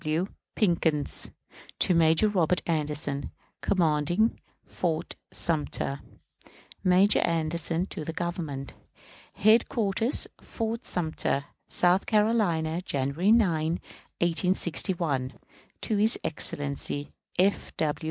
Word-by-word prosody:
F. - - -18
W. 155 +4 +1 0.3
PICKENS. 165 -7 0 0.5
To - - +3
Major 165 +4 +4
Robert 180 -4 +1
Anderson, 150 -3 -2 0.3
commanding 175 +4 +1 0.3
Fort 165 -3 -3 0.2
Sumter. 150 -3 0 0.8
Major 190 +2 +5
Anderson 165 +1 0
to 165 - -6
the 165 - -4
Governor. 165 -5 -4 0.7
Headquarters, 225 +1 +3
Fort 230 +1 -4
Sumter, 155 -4 -1 0.2
South 180 +2 +3
Carolina, 200 -7 +2
January 145 +5 0
9, 165 -8 +3 0.4
1861. 170 -5 0 0.5
To 215 - 0
his 220 +3 +3
Excellency 145 -2 -3 0.2
F. 195 +2 +1
W. 150 -2 0
170 Hz, 95 wpm, -27 LUFS, 155-195 Hz, 0.8 s, Major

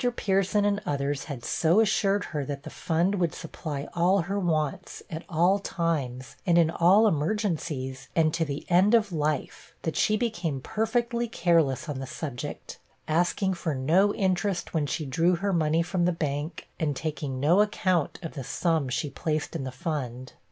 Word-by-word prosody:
Pierson 195 0 +1
and 205 0 +1
others 140 -5 -2
had 130 -6 -7
so 170 +5 +3
assured 205 -2 +2
her, 150 -4 -3
that 140 +1 -5
the - - -8
fund 170 +3 0
would 170 -3 0
supply 150 -4 -5
all 180 +3 +3
her 195 +4 -2
wants, 155 -6 -2
at 160 +2 -5
all 180 +4 +3
times, 145 -10 -2
and 175 -2 +3
in 165 -2 +4
all 185 +6 +5
emergencies, 155 - -1
and 155 -2 +3
to 165 - +1
the 145 -1 -4
end 190 +6 +5
of 215 -4 +2
life, 150 -3 -2
that 160 - -2
she 215 - +2
became 180 - -2
perfectly 235 - -1
careless 165 - +2
on 145 -3 -4
the 135 - -5
subject 140 -3 -6 0.3
asking 175 +4 +1
for 165 -4 -2
no 170 +10 +3
interest 190 -1 0
when 155 -3 0
she 155 - -2
drew 165 +6 +2
her 200 +3 -1
money 160 0 +2
from 175 0 0
the 180 - +3
bank, 155 0 -3
and 150 -3 0
taking 145 -3 -3
no 165 +9 +4
account 185 -6 +1
of 165 - -5
the 135 - -5
sum 145 +3 0
she 150 +5 -1
placed 155 0 -2
in 140 -5 -3
the 130 - -4
fund. 130 -3 -4
165 Hz, 175 wpm, -27 LUFS, 145-190 Hz, 0.3 s, all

